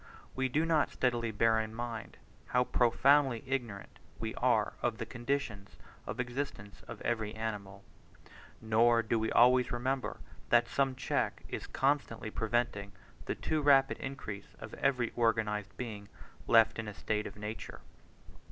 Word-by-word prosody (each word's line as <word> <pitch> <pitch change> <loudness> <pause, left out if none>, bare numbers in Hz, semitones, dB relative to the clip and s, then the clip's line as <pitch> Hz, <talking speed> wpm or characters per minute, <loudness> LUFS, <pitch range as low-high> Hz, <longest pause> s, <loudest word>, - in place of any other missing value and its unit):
We 130 0 0
do 155 +6 +1
not 160 -2 +2
steadily 120 -2 0
bear 110 +1 +3
in 110 0 -4
mind, 115 -2 -5 0.3
how 125 0 +3
profoundly 130 +1 +3
ignorant 120 -7 -4 0.2
we 110 0 -4
are 120 -5 +2
of 120 -2 0
the 115 - -4
conditions 120 -4 -3 0.3
of 120 - -5
existence 125 -5 -4
of - - -8
every 110 -2 -1
animal; 100 -3 -5 0.8
nor 115 +1 +3
do 115 +1 0
we 110 0 -1
always 125 +1 +5
remember, 130 +2 -2 0.3
that 120 0 +5
some 135 +2 0
check 130 - -1
is - - -5
constantly 135 -5 0
preventing 110 -3 -1 0.3
the - - -2
too 155 -1 -1
rapid 135 -2 +4
increase 105 -7 -7
of - - -9
every 125 -4 0
organized 110 -4 0
being 105 -5 -6 0.4
left 115 0 +5
in 110 - -4
a 105 - -6
state 105 0 -2
of - - -10
nature. 105 +1 -7
115 Hz, 145 wpm, -32 LUFS, 110-130 Hz, 0.8 s, always